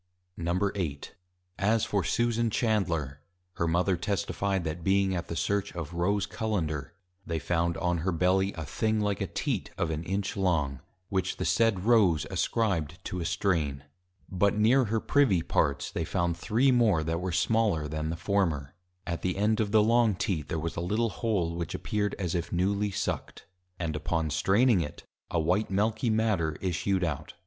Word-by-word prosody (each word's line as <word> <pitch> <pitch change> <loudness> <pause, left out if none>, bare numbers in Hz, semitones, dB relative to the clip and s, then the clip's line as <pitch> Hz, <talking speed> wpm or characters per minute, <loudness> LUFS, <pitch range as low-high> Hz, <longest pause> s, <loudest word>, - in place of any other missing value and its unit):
VIII. 85 -3 -1 0.6
As 110 +2 +2
for 100 -3 0
Susan 115 +4 +1
Chandler, 85 - 0 0.4
her 85 - +1
Mother 90 +3 +2
Testified, 95 +1 -1
That 80 +1 -4
being 95 +1 +2
at 85 -2 -3
the 85 - -4
search 100 +2 -1
of 85 -1 -5
Rose 100 +4 +1
Cullender, 80 -13 -3 0.3
they 85 -2 -3
found 85 +2 0
on 90 0 0
her 90 +4 0
Belly 95 +3 +2
a 80 -2 -6
thing 110 +7 0
like 105 -2 -1
a - - 0
Teat, - - -2
of 80 - 0
an 80 +1 -3
Inch 100 +3 -2
long; 80 -9 0 0.3
which 95 -1 -1
the - - -2
said 115 -5 +2
Rose 100 - +4
ascribed 85 -8 0
to 90 - -3
a 85 - -3
strain. 85 -6 0 0.4
But 100 +2 +1
near 120 +5 +4
her 110 +1 0
Privy 110 - +3
parts, 70 -1 0
they - - -2
found 85 -1 0
Three 115 +10 +2
more, 110 -10 +3
that 80 +2 -2
were 90 0 -2
smaller 95 -3 +1
than 75 +1 -3
the 80 - -2
former. 85 -7 0 0.3
At 85 -2 -3
the 90 0 -1
end 105 +2 +2
of 105 -2 0
the 110 -1 +5
long 115 -2 +3
Teat, 95 -7 -2
there - - -1
was 80 +1 -3
a 85 - -2
little 110 +6 0
Hole, 95 -7 -1
which 85 -2 -4
appeared, 105 -1 -1
as 90 -4 -2
if 85 -2 -2
newly 100 +4 +1
Sucked; 100 0 -4 0.3
and 80 -3 -3
upon 80 0 -1
straining 100 - +3
it, 75 -2 -6 0.3
a 85 - 0
white 90 +7 +1
Milky 110 +5 +1
matter 110 -8 +1
issued 95 +1 0
out. 75 -5 -3
95 Hz, 175 wpm, -28 LUFS, 85-105 Hz, 0.6 s, the